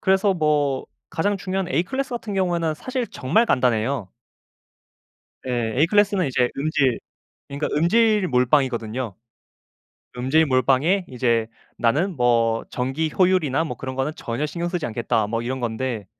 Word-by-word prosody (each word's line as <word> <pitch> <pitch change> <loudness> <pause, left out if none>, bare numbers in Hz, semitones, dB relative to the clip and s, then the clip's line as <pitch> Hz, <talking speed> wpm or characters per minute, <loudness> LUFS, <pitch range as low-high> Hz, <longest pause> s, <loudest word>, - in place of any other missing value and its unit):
그래서 190 0 +3
뭐 150 -4 +1 0.2
가장 200 +5 0
중요한 190 -1 -3
A클래스 265 +11 -1
같은 230 -4 -4
경우에는 170 -4 0
사실 255 - -3
정말 150 - +1
간단해요. 125 - 0 1.4
예. 120 -3 -1
A클래스는 200 0 +3
이제 125 -2 +1
음질 140 -4 +1 0.5
그러니까 140 +2 -3
음질 210 +4 +3
몰빵이거든요. 125 -4 +1 1.0
음질 135 +6 +3
몰빵에 140 +8 +2
이제 115 -3 0 0.7
뭐 115 -2 +2
'전기 135 +5 -2
효율이나 180 -6 +3
뭐 160 - -5
그런 130 0 -6
거는 135 +3 -1
전혀 120 +6 -3
신경 170 +3 -3
쓰지 175 -3 -2
않겠다.' 115 -1 -1
뭐 115 +2 -2
이런 130 +2 -3
건데 120 -2 -3
140 Hz, 305 characters per minute, -23 LUFS, 125-180 Hz, 1.4 s, 그래서